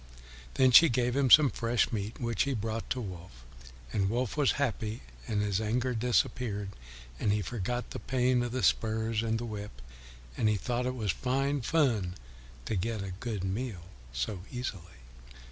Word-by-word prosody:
Then 130 -1 +5
she 165 +6 +9
gave 120 0 +1
him 140 -2 +2
some 145 +1 +8
fresh 115 0 +1
meat, 105 -1 -4
which 115 -4 -1
he 140 -1 +1
brought 110 +1 -3
to 130 - -1
Wolf. 85 - -8 0.5
And 95 -1 +1
Wolf 120 +1 -1
was 145 -3 +3
happy, 110 - -2 0.2
and 105 -1 0
his 100 0 0
anger 120 +4 0
disappeared, 115 -3 0 0.5
and 105 - +1
he 105 0 +1
forgot 120 +4 -3
the - - -5
pain 125 -1 +1
of 120 -1 -2
the 130 -2 -2
spurs 110 +2 +1
and 115 -1 0
the 120 - -4
whip, 105 - -7 0.6
and 110 - +2
he 105 - +2
thought 125 +4 -1
it 130 - -2
was 110 -6 0
fine 135 - 0
fun 115 - +1 0.5
to 110 - -1
get 105 +2 -2
a 95 -2 -5
good 110 -6 -3
meal 95 -1 -3 0.3
so 60 - -3
easily. 100 -9 -6
115 Hz, 175 wpm, -30 LUFS, 105-125 Hz, 0.6 s, she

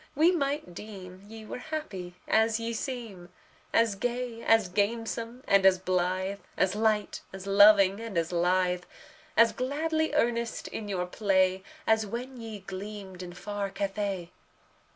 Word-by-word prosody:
we 320 +5 +5
might 285 - -1
deem 185 -2 -9
Ye 220 0 -10
were 230 - -6
happy 245 - -5
as 220 +1 +3
ye 230 0 -3
seem 225 -8 -5 0.4
As 230 -2 +3
gay, 240 +2 -3
as 225 -4 +4
gamesome, 230 +5 -2
and 195 -1 +5
as 190 -1 +6
blithe, 185 +1 -1 0.2
As 185 - +2
light, 215 -1 +1
as 190 0 -8
loving, 200 0 +6
and 225 -5 -5
as 165 0 0
lithe, 180 +1 +1 0.5
As 230 0 +7
gladly 315 +4 -1
earnest 235 -4 0
in 215 - -5
your 185 -3 -1
play, 190 -1 +2 0.2
As 220 -1 +3
when 250 +5 -5
ye 225 -3 -7
gleamed 195 -1 -7
in 175 -1 -7
far 200 +2 -4
Cathay. 195 -2 -3
205 Hz, 145 wpm, -29 LUFS, 185-230 Hz, 0.5 s, As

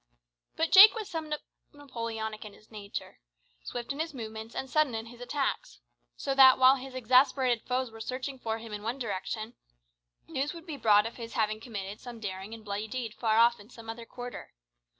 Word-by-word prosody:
But 325 0 0
Jake 410 +4 +10
was 435 -3 -4
somewhat 310 -5 -4 0.3
Napoleonic 230 -6 -5
in 210 -2 -10
his 215 - -20
character, 205 -2 -7 0.4
swift 245 +2 -5
in 280 - -9
his 320 -2 -3
movements, 220 -1 -7
and 265 - -3
sudden 295 -3 +2
in 225 0 -4
his 240 +1 -13
attacks; 275 +3 -2 0.4
so 275 - -1
that, 265 -1 +8
while 260 +1 +6
his 260 0 -9
exasperated 255 -1 +3
foes 255 -1 -1
were 225 0 -10
searching 255 +3 -5
for 225 -2 -2
him 225 -1 -9
in 210 - -5
one 230 +5 -3
direction, 215 0 -4 0.7
news 295 0 -2
would 335 0 -10
be 320 -4 -5
brought 215 -4 +4
of 230 - -6
his 230 -1 -7
having 215 -1 0
committed 205 -3 -6
some 240 -2 -9
daring 190 -1 -6
and 220 -1 -14
bloody 205 +1 -3
deed 230 -1 -4
far 220 -2 +1
off 235 0 +5
in 205 +2 -15
some 225 -2 -8
other 230 0 -10
quarter. 245 0 -8
235 Hz, 195 wpm, -29 LUFS, 220-265 Hz, 0.7 s, Jake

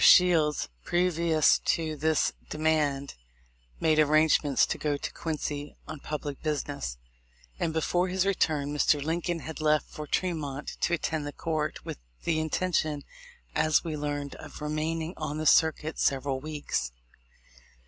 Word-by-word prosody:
Shields, 165 -5 +6 0.2
previous 170 - +3
to 160 -2 0
this 155 +2 +1 0.2
demand, 150 -3 +1 0.7
made 155 -1 +3
arrangements 155 -2 +4
to - - -3
go 145 -2 0
to - - -5
Ouincy 150 -2 -4
on 155 -1 -6
public 145 -1 -5
business; 145 - -3 0.6
and 160 - 0
before 175 +3 +1
his 185 +1 +1
return 155 -7 +1
Mr. 150 0 +3
Lincoln 165 +3 -1
had 160 +1 -6
left 155 0 +3
for 150 -1 -8
Tremont 150 -5 -2
to 175 - +3
attend 155 -2 -2
the - - -4
court, 155 -1 -3
with - - -6 0.2
the 160 -2 +1
intention, 155 -2 0 0.5
as 155 -1 +3
we 165 -3 -3
learned, 145 -1 -3
of - - -10
remaining 155 +2 -2
on 155 -1 -3
the 155 - -3
circuit 160 0 +3
several 135 0 +1
weeks. 145 - -3
155 Hz, 140 wpm, -28 LUFS, 145-160 Hz, 0.7 s, Shields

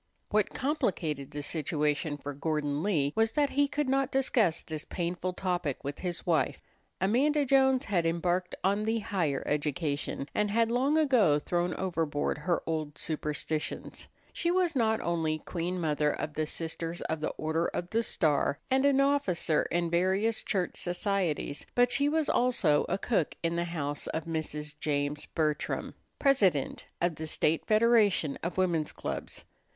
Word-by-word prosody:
What 210 -1 +2
complicated 165 - -1
the 145 0 -6
situation 150 0 0
for 145 0 -6
Gordon 145 0 -1
Lee 150 -8 +1
was 225 0 +2
that 290 -2 +2
he 285 +1 +3
could 295 0 -1
not 270 0 +2
discuss 235 -10 +2
this 155 -1 -5
painful 180 +1 -3
topic 180 -7 -2
with 140 0 -5
his 175 -2 -4
wife. 165 -3 +1 0.4
Amanda 280 +10 +2
Jones 265 0 +4
had 185 -5 +1
embarked 175 +2 0
on 200 +3 +2
the 225 +1 +1
higher 170 -10 -1
education, 145 -1 -2
and 210 0 +1
had 230 +2 +2
long 270 +6 +2
ago 245 - +4
thrown 175 +3 -1
overboard 165 -6 -1
her 170 +3 0
old 155 -2 -3
superstitions. 150 0 -3 0.3
She 340 - 0
was 355 -2 +2
not 220 -3 +2
only 160 -2 0
Queen 175 +3 -3
Mother 150 -2 +1
of 150 +1 -3
the 155 0 -1
Sisters 165 +1 -4
of 160 - -2
the 155 - -1
Order 160 +2 0
of 175 +1 -4
the 230 - +2
Star, 150 -9 +1
and 265 +1 +3
an 280 -1 +4
officer 205 - +1
in 170 -1 0
various 190 +6 +2
church 185 -4 -1
societies, 175 -5 -1
but 245 0 +4
she 280 +3 +3
was 315 0 +1
also 220 -12 +2
a - - +1
cook 200 -6 0
in 165 0 0
the 170 0 0
house 145 -4 -3
of 160 - -3
Mrs. 150 -2 -3
James 145 0 -1
Bertram, 155 -2 -1 0.2
President 200 - +2
of 170 -3 0
the 160 - -5
State 155 +1 0
Federation 215 -8 +4
of 170 +2 -4
Women's 170 -5 +1
Clubs. - - -5
175 Hz, 160 wpm, -30 LUFS, 155-225 Hz, 0.4 s, Jones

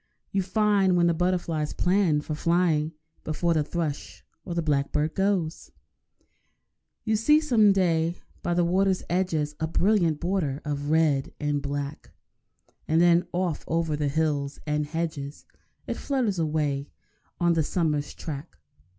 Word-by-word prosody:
You 195 - +1
find 195 -1 +2
when 170 - +4
the 170 - +3
butterflies 170 -3 -1
plan 180 -5 +2
for 155 - -5
flying 165 -1 +1 0.3
(Before 170 +2 0
the 155 - +2
thrush 155 -2 -4 0.2
or 170 - -5
the 170 - 0
blackbird 150 +1 0
goes), 190 -4 -1 1.3
You 220 -1 +1
see 300 +8 +4
some 230 -9 +4
day 170 -3 +1 0.3
by 175 - -1
the 175 - +3
water's 190 +2 +2
edges 165 -5 0
A 160 - 0
brilliant 170 -3 +2
border 170 -6 -1
of 145 -1 -3
red 155 -4 +2
and 145 -1 -1
black; 140 +1 -5 0.8
And 160 +1 +3
then 175 0 +4
off 175 -3 -1
over 165 -2 0
the 145 -1 -1
hills 145 -2 -1
and 150 -1 -1
hedges 155 -3 -4 0.4
It - - -4
flutters 245 -10 -1
away 150 -3 -1 0.5
on 175 -1 +3
the 165 - +2
summer's 150 -2 -1
track. 150 0 -7
165 Hz, 140 wpm, -26 LUFS, 150-180 Hz, 1.3 s, when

